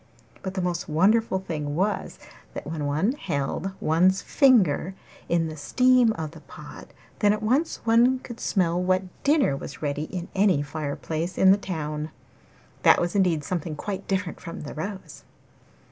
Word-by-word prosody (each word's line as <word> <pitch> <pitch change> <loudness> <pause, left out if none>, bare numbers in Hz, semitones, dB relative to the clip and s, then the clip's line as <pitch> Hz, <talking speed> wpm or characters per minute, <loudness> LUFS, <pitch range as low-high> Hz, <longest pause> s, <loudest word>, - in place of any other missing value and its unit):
But 190 0 -5
the 185 - -1
most 175 -2 -2
wonderful 195 +6 +3
thing 150 -6 -4
was, 200 +5 -1 0.4
that - - -6
when 150 -1 -3
one 155 +10 +1
held 185 - -3
one's 180 +5 +2
finger 195 - +3 0.3
in 170 -1 +2
the 155 - -6
steam 250 - +3
of 160 -4 -5
the 165 - -12
pot, - - -12 0.3
then 205 -1 +4
at 215 0 -4
once 265 +8 0
one 235 +3 +4
could 240 -2 -10
smell 180 -3 +1
what 185 +1 +1 0.2
dinner 280 - +3
was 140 +2 -8
ready 145 +1 -2
in 180 +1 -6
any 190 -7 +3
fire 145 0 -4
place 165 +3 -4
in 190 - +6
the - - +7
town. 155 -6 -4 0.7
That - - +6
was 175 0 -1
indeed 175 -6 +2
something 165 -1 -3
quite 195 +4 -5
different 190 -2 -2
from 165 - -8
the 145 - -7
rose. 190 +5 -7
180 Hz, 165 wpm, -25 LUFS, 155-205 Hz, 0.7 s, the